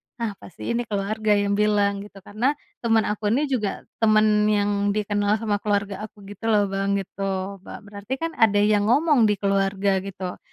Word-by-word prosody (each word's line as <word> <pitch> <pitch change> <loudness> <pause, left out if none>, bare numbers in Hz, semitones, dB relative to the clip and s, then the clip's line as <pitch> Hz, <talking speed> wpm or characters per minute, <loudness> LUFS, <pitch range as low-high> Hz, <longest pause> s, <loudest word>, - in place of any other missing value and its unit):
"Nah, 230 -3 -3
pasti 190 - -7
ini 235 -1 -2
keluarga 210 +1 0
yang 205 0 +1
bilang," 205 -1 +2
gitu, 200 -1 -12
karena 245 +8 -1 0.2
temen 225 -2 +2
aku 210 0 -2
ini 255 +8 +2
juga 215 -6 -2 0.2
temen 215 -1 +4
yang 205 -1 +1
dikenal 205 0 +1
sama 215 -2 -1
keluarga 205 0 -2
aku, 205 -1 -19
gitu 215 +3 -6
loh, 205 -3 +2
Bang, 195 0 0
gitu. 195 0 -4
Ba 235 - -9
berarti 205 +4 -6
kan 330 +4 -3
ada 205 -7 +3
yang 210 0 +2
ngomong 280 -3 +4
di 210 - +2
keluarga, 195 0 +1
gitu. 190 -1 -6
205 Hz, 175 wpm, -23 LUFS, 200-215 Hz, 0.2 s, temen